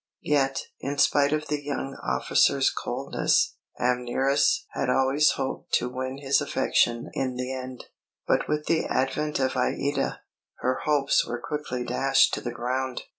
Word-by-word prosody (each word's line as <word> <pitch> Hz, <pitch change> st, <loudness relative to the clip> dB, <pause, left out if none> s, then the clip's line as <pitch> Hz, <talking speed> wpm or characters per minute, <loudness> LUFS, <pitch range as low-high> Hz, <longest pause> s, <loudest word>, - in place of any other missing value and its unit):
Yet, 135 Hz, -2 st, +1 dB, 0.2 s
in 140 Hz, +2 st, -4 dB
spite 145 Hz, 0 st, +3 dB
of 155 Hz, 0 st, 0 dB
the 145 Hz, 0 st, -2 dB
young 135 Hz, -1 st, -4 dB
officer's -, -, +2 dB
coldness, -, -, 0 dB, 0.2 s
Amneris 125 Hz, +3 st, +1 dB
had 125 Hz, -, -2 dB
always 135 Hz, +4 st, +3 dB
hoped 135 Hz, -1 st, -5 dB
to 125 Hz, -, +2 dB
win 130 Hz, +1 st, -4 dB
his 140 Hz, -1 st, +2 dB
affection 120 Hz, 0 st, +1 dB
in 130 Hz, -2 st, -2 dB
the 125 Hz, +1 st, -3 dB
end; 130 Hz, -1 st, -7 dB, 0.4 s
but -, -, +1 dB
with 150 Hz, 0 st, -1 dB
the 165 Hz, -1 st, +1 dB
advent 150 Hz, +4 st, -1 dB
of 130 Hz, -1 st, +1 dB
Aïda, 135 Hz, +2 st, -1 dB, 0.4 s
her 130 Hz, +1 st, 0 dB
hopes 145 Hz, -2 st, +3 dB
were 120 Hz, -, -4 dB
quickly 130 Hz, -2 st, -4 dB
dashed 135 Hz, +3 st, +3 dB
to -, -, -1 dB
the 120 Hz, -, -4 dB
ground. 125 Hz, +2 st, -3 dB
135 Hz, 150 wpm, -26 LUFS, 125-145 Hz, 0.4 s, spite